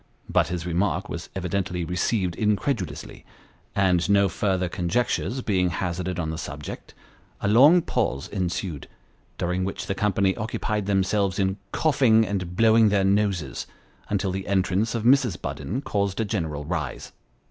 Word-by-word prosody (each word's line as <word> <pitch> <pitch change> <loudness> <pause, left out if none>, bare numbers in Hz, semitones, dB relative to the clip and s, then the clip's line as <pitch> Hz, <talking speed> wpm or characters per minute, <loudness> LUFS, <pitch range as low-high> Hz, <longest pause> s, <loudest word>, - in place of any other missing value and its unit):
But - - +2
his 90 -1 -4
remark 90 +1 0
was - - -6
evidently 90 -1 -2
received 90 +1 0
incredulously; 105 - -2 0.5
and 90 -2 +2
no 100 -1 +4
further 95 0 0
conjectures 115 +8 -1
being 90 -4 +1
hazarded 90 +1 -3
on 80 -3 -2
the 80 - -5
subject, 75 -2 -7 0.4
a - - -1
long 145 - +6
pause 70 - -1
ensued, 90 -5 -3 0.5
during 90 +1 -1
which 95 - -4
the - - -1
company 95 -1 +1
occupied 105 -1 -2
themselves 100 -1 +1
in 95 0 0
coughing 130 -8 +3
and 90 -4 -3
blowing 110 0 +5
their 100 -1 +2
noses, 95 -9 0 0.4
until 100 -2 0
the 95 +1 -4
entrance 100 +3 +1
of 115 - -2
Mrs. 125 -5 +3
Budden 130 +9 -4
caused 100 -4 -1
a 110 - +1
general 80 -9 -3
rise. - - -4
95 Hz, 145 wpm, -25 LUFS, 90-105 Hz, 0.5 s, long